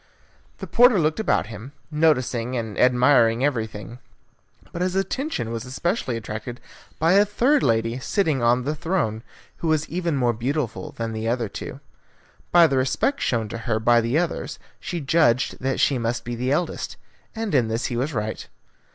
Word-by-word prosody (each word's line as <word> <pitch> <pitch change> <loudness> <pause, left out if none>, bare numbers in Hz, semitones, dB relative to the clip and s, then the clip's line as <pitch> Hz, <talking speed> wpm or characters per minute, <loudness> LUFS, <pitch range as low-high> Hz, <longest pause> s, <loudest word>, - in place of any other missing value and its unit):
The - - -6
porter 245 -2 +5
looked 155 +2 +1
about 220 - +1
him, 115 +5 -10 0.2
noticing 130 -6 +1
and 110 -3 -4
admiring 125 -1 +4
everything; 115 -3 -3 0.7
but 175 - -5
his 185 0 0
attention 195 - -2
was 115 -1 -3
specially 170 - -1
attracted 110 +2 -6 0.4
by 165 +4 +3
a 200 +1 +6
third 250 +8 +2
lady 115 +1 +1
sitting 155 - 0
on 120 +2 +3
the 145 +4 -1
throne, 155 - -1 0.4
who 170 - -3
was 155 -1 +1
even 170 -2 -1
more 120 -2 +2
beautiful 125 +1 -3
than 115 -1 -4
the 110 0 -3
other 120 -1 0
two. - - -8 0.7
By 175 -1 +7
the 135 -4 +1
respect 135 - 0
shown 115 -3 0
to 115 - -5
her 110 -1 +2
by 120 +1 +4
the 115 +6 0
others, 175 0 -2 0.2
he 175 -1 -4
judged 135 -4 +2
that 135 +1 -1
she 135 -3 +2
must 120 +1 -2
be 120 - -4
the 125 +3 -2
eldest, 170 +4 -2 0.4
and 225 -5 -3
in 125 -5 +3
this 115 +2 -2
he 120 - -2
was 130 +6 -1
right. 110 -4 -4
130 Hz, 175 wpm, -23 LUFS, 115-165 Hz, 0.7 s, By